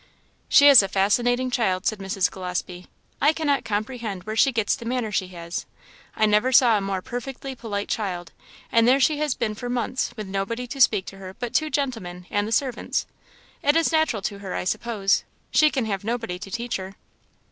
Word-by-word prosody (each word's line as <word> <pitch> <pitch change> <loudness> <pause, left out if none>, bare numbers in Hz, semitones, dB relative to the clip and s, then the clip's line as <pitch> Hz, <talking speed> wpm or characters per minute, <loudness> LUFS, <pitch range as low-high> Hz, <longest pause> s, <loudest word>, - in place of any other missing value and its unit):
"She 285 - +7
is 275 -5 +10
a 195 - -2
fascinating 245 +7 +1
child," 195 -7 0
said 215 - 0
Mrs. 195 -1 0
Gillespie. 180 -1 -5 0.3
"I 295 +2 +5
cannot 290 -4 0
comprehend 215 -2 -3
where 215 +2 -5
she 270 +4 +4
gets 225 -4 +1
the 260 - -10
manner 235 -2 -2
she 190 -2 -1
has. 170 -1 -6 0.5
I 215 - +3
never 210 +4 +3
saw 240 -3 +6
a 205 - +1
more 195 -1 -3
perfectly 260 +2 -6
polite 210 -5 -4
child, 180 -5 -3 0.4
and 230 0 +4
there 260 +2 +5
she 290 +3 +2
has 300 -4 0
been 220 -2 -2
for 245 +3 -6
months, 245 +1 -1
with 215 - -5
nobody 195 +6 -3
to 270 +3 -5
speak 205 -6 +4
to 195 - -9
her 190 0 -9
but 240 +1 -5
two 310 -1 +1
gentlemen 225 -12 -3
and 205 0 0
the - - -5
servants. 255 0 -1 0.6
It 290 +2 +3
is 330 0 +3
natural 315 -10 +1
to 200 -1 -3
her, 195 -2 -5
I - - -2
suppose; 200 +1 0 0.3
she 310 - +5
can 265 -5 -1
have 200 -3 -3
nobody 225 -5 -3
to 195 - -8
teach 235 +4 -3
her." 190 +1 -8
220 Hz, 200 wpm, -24 LUFS, 195-255 Hz, 0.6 s, is